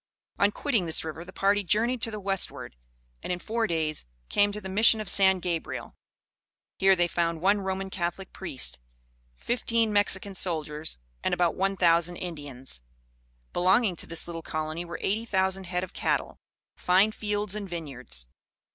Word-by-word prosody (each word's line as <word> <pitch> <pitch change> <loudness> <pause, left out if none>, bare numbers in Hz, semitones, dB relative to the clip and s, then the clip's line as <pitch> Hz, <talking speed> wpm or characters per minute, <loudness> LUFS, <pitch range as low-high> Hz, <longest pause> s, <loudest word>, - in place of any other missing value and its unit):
On 200 - +5
quitting 230 -6 0
this 160 - +3
river, 160 +1 -6
the 185 - -11
party 200 +2 +2
journeyed 230 +6 +1
to 230 - +3
the 215 -1 -5
westward, 195 - -2 0.5
and, - - -4
in 180 - 0
four 225 +4 -1
days, 155 -2 -1 0.3
came 205 0 +3
to 210 - -4
the 195 - -7
Mission 220 +3 +5
of 215 - -4
San 190 0 +7
Gabriel. 170 -2 -4 0.9
Here 195 0 +6
they 175 -1 +2
found 170 -1 0
one 200 +4 +3
Roman 190 0 -3
Catholic 180 +1 -3
priest, 130 - -3 0.6
fifteen 230 - 0
Mexican 200 -1 +2
soldiers, 155 - -1 0.3
and - - +1
about 175 -2 +2
one 195 +1 0
thousand 170 0 +3
Indians. 145 - -6 0.7
Belonging 190 +2 +3
to - - -6
this 165 - -1
little 165 -1 -5
colony 155 +1 -3
were 170 -1 -6
eighty 215 +3 0
thousand 190 -2 0
head 180 0 -2
of 185 - -7
cattle, - - -1 0.4
fine 190 +4 +4
fields 210 -2 -1
and 205 -2 -5
vineyards. 135 - -5
185 Hz, 165 wpm, -27 LUFS, 165-205 Hz, 0.9 s, San